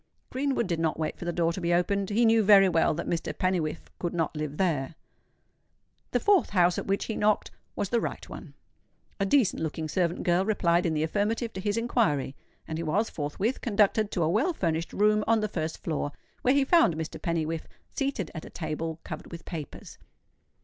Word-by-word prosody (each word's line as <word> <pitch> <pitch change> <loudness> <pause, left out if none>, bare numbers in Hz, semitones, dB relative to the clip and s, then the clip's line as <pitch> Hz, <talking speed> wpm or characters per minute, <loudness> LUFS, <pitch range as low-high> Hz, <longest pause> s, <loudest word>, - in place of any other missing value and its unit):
Greenwood 270 -1 0
did 170 -3 -2
not 160 -1 0
wait 155 -1 -3
for - - -6
the 175 - 0
door 170 -1 +1
to 185 - -5
be 170 0 +2
opened; 195 +2 0
he 225 +3 +3
knew 225 0 +5
very 200 -2 +7
well 165 -3 +2
that 170 - -4
Mr. 170 -1 -3
Pennywhiffe 170 -4 -1
could 175 -1 -3
not 165 -2 -1
live 150 -1 -4
there. 160 -5 0 1.1
The - - +1
fourth 405 -3 +3
house 180 -3 +3
at - - -6
which 195 +1 0
he 220 - -3
knocked 210 0 +1 0.2
was 200 - -2
the 235 -1 +1
right - - -4
one. - - -10 0.6
A 195 - +1
decent 225 - +3
looking 160 0 -3
servant 175 +2 0
girl 175 +1 +3
replied 180 -4 +2
in 160 - 0
the 155 - +1
affirmative 215 +7 -1
to 190 - -5
his 205 +2 -1
inquiry; 215 - +1 0.3
and 160 0 -4
he - - -2
was 195 +8 0
forthwith 175 - -2
conducted 210 -1 +2
to 175 - -1
a - - +2
well 225 - +2
furnished 165 - -1
room 210 +1 +3
on 225 0 +4
the 215 - 0
first 160 -5 -3
floor, 145 -2 -2 0.3
where 255 +2 +3
he 280 -1 +3
found 330 - +4
Mr. 160 -1 -5
Pennywhiffe 165 -1 -2 0.3
seated 275 - -2
at 160 - -6
a - - -9
table 160 0 -4
covered - - -8
with 170 0 -9
papers. 155 -6 -8
180 Hz, 205 wpm, -28 LUFS, 160-215 Hz, 1.1 s, very